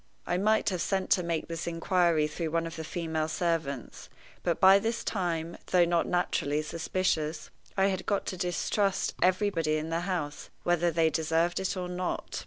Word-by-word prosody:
I 175 - 0
might 215 +2 +3
have 180 -3 -2
sent 190 -1 -1
to 180 - +5
make 170 -2 -2
this 165 0 -5
inquiry 170 -2 +2
through 160 +2 -3
one 165 +1 0
of 165 - -6
the 160 - -5
female 160 -1 -2
servants; 160 -6 -2 0.3
but 170 -2 0
by 190 +1 +8
this 225 +3 -2
time, 170 -4 -2
though 180 -2 +4
not 170 0 +1
naturally 155 -4 0
suspicious, 160 -1 -1 0.3
I 190 - +4
had 190 -2 -1
got 200 - 0
to - - -3
distrust 185 +3 0
everybody 180 -4 +2
in 155 +1 -4
the 165 - +1
house, 170 -5 -3
whether 175 0 +2
they 165 -1 +2
deserved 165 +2 +1
it 190 0 -2
or 180 -1 -3
not. 180 0 -3
170 Hz, 180 wpm, -29 LUFS, 160-185 Hz, 0.3 s, by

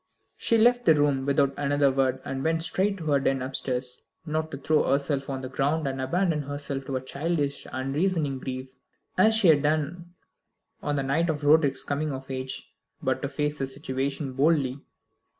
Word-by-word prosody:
She 230 - +2
left 245 +2 +4
the 160 - +6
room 145 -2 +1
without 140 -1 +3
another 145 -1 +2
word, 130 -1 +1
and 135 -1 -3
went 165 0 +1
straight 195 +4 0
to 165 - -7
her 140 - +4
den 135 -1 0
upstairs, 130 -1 -3 0.2
not 155 0 -2
to 140 - -6
throw 150 +2 +2
herself 140 0 0
on 135 -1 -3
the 130 - -5
ground, 140 +4 0
and 135 -1 -3
abandon 165 +3 +1
herself 140 -1 -5
to 135 - -2
a 130 - -1
childish 145 +1 -2
unreasoning 140 +2 -1
grief, 130 0 -6 0.4
as 220 +4 +5
she 210 -6 +5
had 150 -3 +6
done 155 +4 -1 0.7
on 145 - -1
the 140 - 0
night 155 +6 +1
of 150 -1 -2
Roderick's 145 -1 +4
coming 145 +1 -2
of 135 0 -6
age, 130 0 -5 0.4
but - - 0
to 140 - -2
face 150 +1 -2
the 135 - -1
situation 135 0 -3
boldly. 140 -1 +2
140 Hz, 185 wpm, -27 LUFS, 135-155 Hz, 0.7 s, the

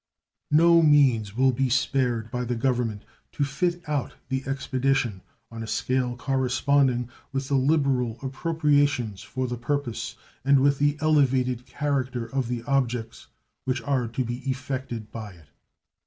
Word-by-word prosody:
No 170 +2 +6
means 130 -9 +4
will 130 +1 +4
be 130 +1 0
spared 120 -2 0
by 125 0 -2
the 120 0 -2
Government 120 -3 -1 0.3
to 145 - 0
fit 170 +6 -1
out 145 -3 -2
the 130 0 -1
expedition 135 -6 0 0.3
on 115 0 -7
a 110 - -5
scale 125 +1 -1
corresponding 130 -1 +1 0.2
with 135 -1 -3
the - - -1
liberal 135 -4 +2
appropriations 145 - +1
for 130 0 -3
the 120 -1 -4
purpose 125 -2 -2 0.3
and 140 +1 +5
with 140 +1 +3
the 145 +1 +2
elevated 130 -5 +2
character 130 -5 -2
of 135 0 -2
the 120 -1 -3
objects 120 -4 -1 0.4
which 130 -2 -1
are 130 -3 0
to 120 +3 -2
be 120 +1 -3
effected 130 -4 -4
by 110 -4 -7
it. 80 -4 -19
130 Hz, 145 wpm, -26 LUFS, 120-140 Hz, 0.4 s, No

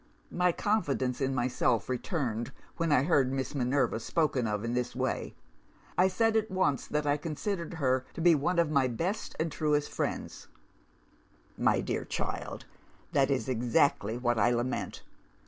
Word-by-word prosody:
"My 180 0 +2
confidence 145 - 0
in 135 0 0
myself 120 -2 +1
returned 125 - -2 0.3
when 165 -2 0
I 135 -3 +5
heard 140 -5 +3
Miss 135 +1 -2
Minerva 130 -3 +1
spoken 135 -2 0
of 105 0 -2
in 115 - -2
this 125 0 -2
way. - - -2 0.6
I 185 - +5
said 225 +4 +1
at 220 0 +1
once 150 -8 0
that 150 0 -1
I 145 0 +2
considered 170 +3 -3
her 130 -4 +1
to - - -6
be 175 0 +6
one 165 +4 +1
of 170 -3 +3
my 140 -3 +3
best 175 - -3
and 160 0 0
truest 150 -1 0
friends. - - -4 1.1
"'My - - +2
dear - - -2
child, - - -4 0.5
that 135 -1 +3
is 135 -2 0
exactly 120 -2 +2
what 120 -2 +1
I 105 - +4
lament! 120 +1 -2
140 Hz, 160 wpm, -30 LUFS, 125-165 Hz, 1.1 s, be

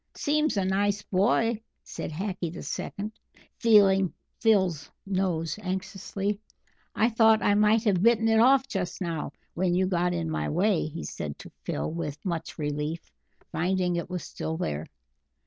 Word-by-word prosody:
"Seems 300 -4 +1
a 195 - +1
nice 200 +2 +1
boy," 220 +3 +2 0.2
said - - -6
Hackee 185 +1 -3
the 175 - -8
Second, 205 +2 -4 0.5
feeling 195 -5 +5 0.3
Phil's 190 -10 +2 0.2
nose 185 -3 -1
anxiously. 195 +1 -3 0.6
"I 220 - +4
thought 225 -1 +4
I 205 - +4
might 210 +2 +4
have 195 -6 +2
bitten 225 +1 +4
it 225 0 +4
off 265 +3 +5
just 190 -8 -3
now 165 -6 -3 0.2
when 175 0 +1
you 185 +1 +3
got 180 -1 +1
in 170 -2 -2
my 160 - -2
way," 180 +1 +2
he 165 +2 -6
said 75 -1 -5
to - - -11
Phil - - -2
with 155 -3 -4
much 170 -3 -3
relief, 150 +2 -3 0.4
finding 180 +2 0
it 170 +1 -3
was 180 -2 -4
still 160 0 -4
there. 75 - -3
190 Hz, 155 wpm, -27 LUFS, 170-210 Hz, 0.6 s, feeling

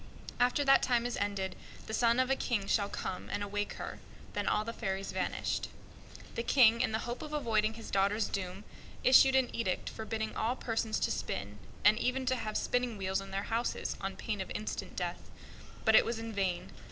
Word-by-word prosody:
After 250 +4 +3
that 275 0 +6
time 240 -2 +2
is 245 - -1
ended, 195 -2 -2 0.3
the 220 - -6
son 235 +2 +3
of 255 +1 +2
a - - +4
King 230 -7 -1
shall 200 0 +1
come 185 - -5
and 205 - -2
awake 205 0 -2
her." - - -6 0.3
Then - - -2
all 215 - +2
the 230 - -4
fairies 195 -3 -3
vanished. - - -1 0.7
The - - -2
King, 235 -2 +5
in - - +1
the 220 +1 -2
hope 240 +1 -4
of 300 - -7
avoiding 220 -6 +1
his 225 - -9
daughter's 200 +2 +2
doom, 190 +1 -4 0.4
issued 265 +1 +7
an 260 -2 +2
edict 205 -6 -1
forbidding 220 0 -4
all 235 +3 0
persons 225 -3 -1
to - - +1
spin, 100 +1 -4 0.3
and 215 +2 +6
even 260 +1 0
to 255 0 +2
have 215 -3 -2
spinning 245 -3 0
wheels 190 0 -1
in 195 - -9
their 195 +1 -2
houses, 235 +1 -1
on 195 0 -3
pain 205 +1 -3
of 190 - -5
instant 215 - -4
death. - - -4 0.6
But 220 - +6
it - - +8
was 230 0 -2
in 225 0 -5
vain. 185 -3 -1
220 Hz, 200 wpm, -32 LUFS, 195-240 Hz, 0.7 s, it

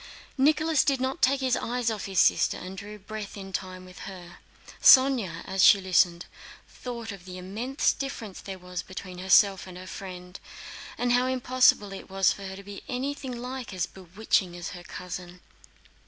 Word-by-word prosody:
Nicholas 310 +2 +3
did 275 -2 +1
not 260 +5 -2
take 270 +1 +3
his 260 -1 +2
eyes 240 -1 -1
off 215 -2 -4
his 190 -1 -6
sister - - +4
and 185 +1 -8
drew 205 +2 -8
breath 210 0 -8
in 195 -1 -9
time 185 -1 -5
with 185 0 -13
her. 175 -2 -11 0.4
Sónya, 250 -11 +6
as 190 0 +1
she 200 - +8
listened, 180 -2 +2 0.4
thought 235 -3 -7
of 195 -3 -11
the 185 -1 -8
immense 220 +10 -1
difference 230 -8 -6
there 195 -1 -7
was 180 0 -6
between 185 -1 -9
herself 190 +1 +4
and 180 -1 -10
her 185 - -9
friend, 180 -1 -8 0.6
and 245 0 0
how 250 +1 +3
impossible 255 -5 +3
it 195 - -9
was 195 0 +3
for 200 -1 -8
her 190 - -7
to 200 - -10
be 200 0 -9
anything 265 0 -4
like 250 -3 -6
as 175 -2 0
bewitching 185 0 -1
as 175 - -5
her 175 - -9
cousin. 180 0 -8
195 Hz, 180 wpm, -27 LUFS, 185-250 Hz, 0.6 s, she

